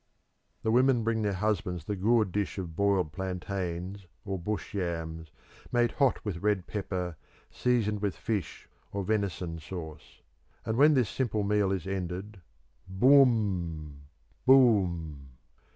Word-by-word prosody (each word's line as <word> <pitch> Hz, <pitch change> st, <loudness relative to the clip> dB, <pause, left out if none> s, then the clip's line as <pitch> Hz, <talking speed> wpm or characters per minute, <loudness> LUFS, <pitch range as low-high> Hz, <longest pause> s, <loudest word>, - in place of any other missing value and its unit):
The 110 Hz, -, +1 dB
women 125 Hz, 0 st, +4 dB
bring 115 Hz, 0 st, 0 dB
their 105 Hz, -2 st, 0 dB
husbands 95 Hz, -5 st, -1 dB
the 105 Hz, -, -2 dB
gourd 105 Hz, +1 st, +2 dB
dish 100 Hz, +2 st, -2 dB
of 85 Hz, -4 st, -5 dB
boiled 95 Hz, -4 st, +2 dB
plantains 95 Hz, +1 st, -4 dB, 0.2 s
or 95 Hz, -2 st, -3 dB
bush 105 Hz, +5 st, -4 dB
yams, 80 Hz, -4 st, -3 dB, 0.4 s
made 120 Hz, -1 st, +2 dB
hot 135 Hz, -5 st, +1 dB
with 90 Hz, -5 st, -3 dB
red 105 Hz, -3 st, +1 dB
pepper, 90 Hz, -5 st, -4 dB, 0.3 s
seasoned 110 Hz, -5 st, 0 dB
with 100 Hz, -6 st, -1 dB
fish 100 Hz, +5 st, -3 dB, 0.2 s
or 100 Hz, -2 st, -3 dB
venison 95 Hz, -5 st, -2 dB
sauce. 80 Hz, -2 st, -9 dB, 0.4 s
And 110 Hz, 0 st, -1 dB
when 150 Hz, +4 st, +6 dB
this 125 Hz, -5 st, +3 dB
simple 110 Hz, -2 st, -1 dB
meal 100 Hz, -1 st, +2 dB
is 95 Hz, -4 st, -2 dB
ended, 95 Hz, +1 st, -4 dB, 0.5 s
boom! 95 Hz, -, +2 dB, 0.4 s
boom! 85 Hz, -, +3 dB
100 Hz, 130 wpm, -29 LUFS, 85-110 Hz, 0.5 s, when